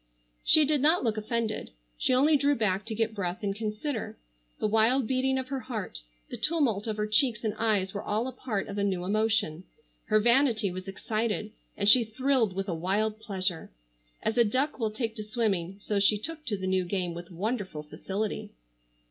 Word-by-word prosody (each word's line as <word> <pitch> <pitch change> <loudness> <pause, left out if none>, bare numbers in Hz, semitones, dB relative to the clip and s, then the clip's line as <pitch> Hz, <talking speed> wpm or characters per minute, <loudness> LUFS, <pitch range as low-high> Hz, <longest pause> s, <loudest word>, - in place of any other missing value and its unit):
She 310 -1 +6
did 295 -1 +2
not 315 +4 +4
look 225 -3 +1
offended. 220 0 -2 0.3
She - - 0
only 280 +5 +5
drew 285 0 +3
back 210 -3 0
to 220 - -3
get 225 0 0
breath 185 -2 -3
and 195 -1 -1
consider. 220 +4 -3 0.4
The - - -2
wild 225 +4 +3
beating 265 +2 +1
of 260 -1 -3
her 275 -1 -2
heart, 225 - -5 0.3
the - - -4
tumult 260 -11 +1
of 215 -1 -2
her 210 - 0
cheeks 215 +1 +2
and 215 -2 0
eyes 210 -4 0
were 200 - -3
all 215 +4 -1
a - - -3
part 230 -6 -3
of 200 0 -4
a - - +1
new 185 -3 0
emotion. 210 -5 +1 0.4
Her 215 0 +3
vanity 235 -3 +3
was 185 +2 -7
excited, 215 +1 -2 0.3
and 200 - 0
she 235 +3 +8
thrilled 230 -1 +1
with 195 +1 -2
a 180 - -1
wild 205 +6 0
pleasure. 190 -6 -2 0.5
As 225 +2 0
a - - +8
duck 260 +7 0
will 220 -2 +1
take 225 +1 -3
to 215 - -4
swimming 200 -5 -1
so 205 0 -1
she 205 +1 +4
took 310 +7 -7
to 210 -4 0
the 190 - -4
new 185 0 +2
game, 180 -1 -2
with 175 0 -8
wonderful 190 -3 -3
facility. 200 +7 -4
215 Hz, 200 wpm, -28 LUFS, 195-240 Hz, 0.5 s, she